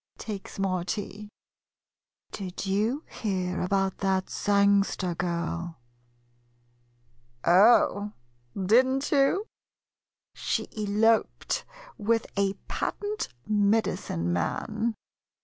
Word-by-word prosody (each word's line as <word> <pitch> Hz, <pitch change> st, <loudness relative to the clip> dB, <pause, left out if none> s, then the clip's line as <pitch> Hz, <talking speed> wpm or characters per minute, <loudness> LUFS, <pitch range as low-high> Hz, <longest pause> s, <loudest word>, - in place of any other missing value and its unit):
[Takes 205 Hz, -3 st, -7 dB
more 185 Hz, -2 st, 0 dB
tea.] 205 Hz, +2 st, -5 dB, 1.0 s
Did 190 Hz, -1 st, -5 dB
you 215 Hz, +10 st, 0 dB
hear 185 Hz, -4 st, -2 dB
about 195 Hz, +1 st, 0 dB
that 190 Hz, -1 st, 0 dB
Sangster 200 Hz, -2 st, +2 dB
girl? 170 Hz, -1 st, -3 dB, 1.7 s
Oh, 205 Hz, +2 st, +5 dB, 0.5 s
did 225 Hz, +7 st, +5 dB
n't 270 Hz, +1 st, -1 dB
you? 285 Hz, +9 st, +3 dB, 0.9 s
She -, -, -2 dB
eloped 215 Hz, +2 st, +1 dB, 0.3 s
with 225 Hz, +1 st, +1 dB
a 200 Hz, -1 st, +1 dB
patent 415 Hz, +1 st, -2 dB, 0.2 s
medicine 200 Hz, -, +1 dB
man. 215 Hz, -, -1 dB
200 Hz, 80 wpm, -27 LUFS, 185-220 Hz, 1.7 s, Oh